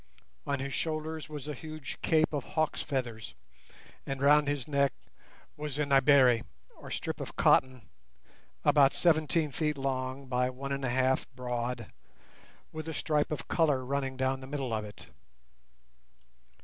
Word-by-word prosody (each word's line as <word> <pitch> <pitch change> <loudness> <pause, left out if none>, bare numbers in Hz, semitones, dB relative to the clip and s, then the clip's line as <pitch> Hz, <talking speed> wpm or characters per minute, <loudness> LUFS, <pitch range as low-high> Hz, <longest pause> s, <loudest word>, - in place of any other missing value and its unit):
On 140 - +1
his 135 0 -4
shoulders 155 -1 -3
was 150 -2 -7
a 150 - -3
huge 155 -1 -8
cape 160 0 +2
of 145 -3 -1
hawk's 155 -1 -1
feathers, 120 - -4 0.7
and 135 -1 -4
round 145 +1 +5
his 145 -2 -2
neck 140 -2 +2 0.6
was 150 -2 -5
a 150 - +1
"naibere", 135 -3 +5 0.4
or - - -11
strip - - -4
of - - -7
cotton, 130 -4 +3 0.8
about 140 -2 +5
seventeen 160 -2 +2
feet 150 +1 -1
long, 135 0 -2
by 125 0 0
one 135 +2 -6
and 140 0 -2
a 130 - 0
half 130 +1 +1
broad, 125 -2 -3 0.8
with 155 0 -6
a 160 - -4
stripe 150 -2 +1
of 145 -5 -4
colour 145 -6 +2
running 135 0 -2
down 130 0 0
the 130 - -9
middle 135 -4 -3
of 110 -1 -1
it. 105 -1 -10
140 Hz, 150 wpm, -30 LUFS, 130-150 Hz, 0.8 s, round